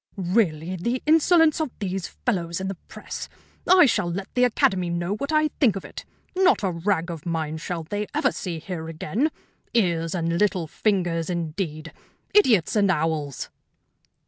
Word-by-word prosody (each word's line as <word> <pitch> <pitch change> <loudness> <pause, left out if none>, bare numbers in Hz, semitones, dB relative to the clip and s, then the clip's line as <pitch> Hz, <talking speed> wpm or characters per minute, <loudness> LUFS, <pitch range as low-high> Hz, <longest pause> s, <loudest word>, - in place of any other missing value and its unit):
"Really, 180 -3 0
the 235 +8 -2
insolence 320 0 +4
of 310 - -1
these 195 -2 -3
fellows 170 -7 -2
in 190 0 -3
the 195 - -4
press! - - -7 0.4
I 365 -2 +8
shall 180 -9 +1
let 190 +2 -5
the 250 0 +4
Academy 185 -6 +1
know 175 +2 -1
what 280 +6 -4
I 310 0 +3
think 240 -9 +4
of 195 - -6
it. - - -9 0.3
Not 375 - +3
a 190 - +1
rag 170 0 -1
of 165 -3 -7
mine 160 -2 -2
shall 165 +1 -4
they 205 +6 -3
ever - - +1
see 175 -3 -4
here 160 -1 -6
again. 165 - -1 0.5
Ears 170 -6 +1
and 170 0 -1
little 190 -5 +1
fingers, 175 -2 0
indeed! 165 -2 -4 0.4
Idiots 230 - +4
and 200 -2 +3
owls!" 155 -5 -1
185 Hz, 165 wpm, -24 LUFS, 165-220 Hz, 0.5 s, I